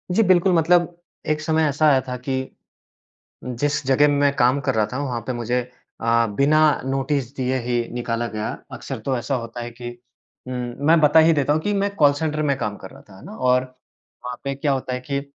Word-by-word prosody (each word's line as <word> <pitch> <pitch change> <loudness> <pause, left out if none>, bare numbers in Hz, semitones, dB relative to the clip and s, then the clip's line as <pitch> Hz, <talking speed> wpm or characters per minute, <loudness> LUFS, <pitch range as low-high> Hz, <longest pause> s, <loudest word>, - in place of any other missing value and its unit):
जी 225 - +5
बिल्कुल 185 0 +4
मतलब 175 +1 +3 0.3
एक 150 0 0
समय 160 0 +1
ऐसा 150 +2 +2
आया 135 -2 +4
था 125 - -3
कि, 130 +1 -4 0.9
जिस 145 +4 -2
जगह 135 +2 +4
मैं 145 -1 +2
काम 125 +3 +3
कर 130 - +1
रहा 110 -1 +2
था 130 - -3
वहाँ 125 -4 -3
पे 130 - -1
मुझे 120 +1 -1 0.4
अ, 115 0 +2
बिना 145 +3 +4 0.3
नोटिस 135 0 -2
दिए 130 0 -1
ही 125 +1 -2 0.2
निकाला 120 -1 -2
गया। 110 0 -4 0.2
अक्सर - - -6
तो 135 -2 0
ऐसा 125 +3 -2
होता 115 0 -5
है 120 - -6
कि 120 +1 -8 0.6
उम, - - -4 0.3
मैं 165 +1 +5
बता 150 +1 +5
ही 165 +1 +5
देता 145 -2 +1
हूँ 155 - +1
कि 205 - -1
मैं 200 0 0
कॉल 145 -4 +5
सेंटर 155 +1 -2
में 140 -2 +1
काम 105 -4 -3
कर 95 - -11
रहा - - -14
था। 95 - -15
है - - -15
ना? - - -9
और 125 0 +2 0.6
वहाँ 125 0 -5
पे 140 0 -2
क्या 140 +1 0
होता 130 -1 -3
है 125 - -4
कि 140 0 0
135 Hz, 220 wpm, -22 LUFS, 125-150 Hz, 0.9 s, जी